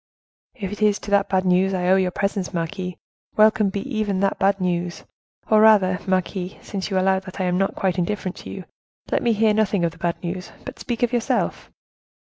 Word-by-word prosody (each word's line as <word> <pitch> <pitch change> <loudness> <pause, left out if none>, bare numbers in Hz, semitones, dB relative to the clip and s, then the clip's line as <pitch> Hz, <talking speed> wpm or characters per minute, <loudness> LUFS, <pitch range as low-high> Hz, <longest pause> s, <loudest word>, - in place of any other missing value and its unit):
"If 200 -6 -5
it 210 - -7
is 210 -1 +3
to 205 - -9
that 200 0 +3
bad 190 -1 +1
news 185 +1 +3
I 180 -1 -1
owe 190 - +6
your 190 -1 +2
presence, 195 0 -2
marquise, 175 +2 -3 0.4
welcome 215 -1 +5
be 195 +1 -3
even 215 -6 -2
that 195 - 0
bad 195 0 +2
news! 175 -1 -2 0.4
or 215 -1 +5
rather, 195 -4 +5
marquise, 185 0 -1
since 195 -1 -4
you 190 - 0
allow 190 0 +3
that 190 0 -10
I - - 0
am 180 0 +1
not 195 - 0
quite 185 -1 0
indifferent 185 0 -2
to - - -9
you, 190 - -7 0.5
let - - +1
me 235 - +2
hear 220 0 +3
nothing 210 -4 +1
of 170 - 0
the 165 - -18
bad 170 0 0
news, 180 +1 -5
but - - -8
speak 240 -1 -3
of 245 0 +1
yourself." 240 -1 -1
190 Hz, 215 wpm, -22 LUFS, 180-210 Hz, 0.5 s, owe